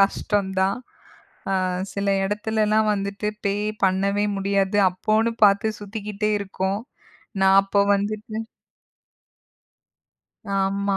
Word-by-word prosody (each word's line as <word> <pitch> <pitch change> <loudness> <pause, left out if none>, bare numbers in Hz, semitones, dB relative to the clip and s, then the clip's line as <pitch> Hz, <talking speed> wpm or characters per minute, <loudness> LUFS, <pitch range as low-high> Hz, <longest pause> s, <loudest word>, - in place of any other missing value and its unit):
கஷ்டம்தான். 195 0 +1 0.7
அ - - +1 0.4
சில 200 0 -2 0.2
இடத்துலலாம் 215 +1 +1
வந்துட்டு 200 +1 -3 0.2
பே 200 - +1 0.3
பண்ணவே 195 +2 +1
முடியாது. 195 0 0
அப்போன்னு 215 +5 +1
பார்த்துச் 205 +2 +3
சுத்திக்கிட்டே 210 0 -3
இருக்கோம். 195 +1 -2 0.6
நான் 190 0 +6
அப்ப 200 +1 +2
வந்துட்டு 215 +2 -3 2.2
ஆமா, 195 +1 0
200 Hz, 90 wpm, -23 LUFS, 195-210 Hz, 2.2 s, நான்